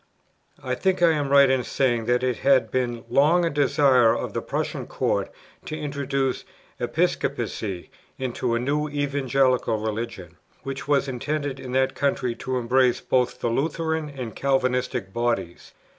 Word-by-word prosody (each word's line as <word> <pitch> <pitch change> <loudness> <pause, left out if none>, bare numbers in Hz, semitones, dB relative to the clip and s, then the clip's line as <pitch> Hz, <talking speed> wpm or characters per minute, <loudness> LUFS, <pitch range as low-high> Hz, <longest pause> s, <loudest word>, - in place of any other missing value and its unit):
I - - -2
think 190 -2 0
I 170 - +6
am 145 -3 -1
right 140 0 +7
in 130 -1 +1
saying 120 -4 0
that 125 +1 +1
it 125 -3 0
had 130 -5 +3
been 120 -2 -1
long 165 +5 +4
a 165 - 0
desire 130 -4 +4
with - - -5
the - - -2
Prussian - - -3
Court - - -1 0.3
to 155 - -5
introduce 140 -3 -2 0.4
Episcopacy 95 -5 -2 0.3
into 125 -1 -2
the 115 - +1
new 150 +4 -1
Evangelical 135 -4 +1
Religion, 105 -5 -5 0.3
which 135 0 -6
was 140 -1 +2
intended 140 +1 -3
in 125 -1 -7
that 130 0 +2
country 130 -3 0
to 130 0 -3
embrace 125 0 +2
both 125 -1 0
the 120 - 0
Lutheran 160 +3 -1
and 130 -5 -7
Calvinistic 125 -6 0
bodies. 120 -7 -2
130 Hz, 150 wpm, -24 LUFS, 120-140 Hz, 0.4 s, right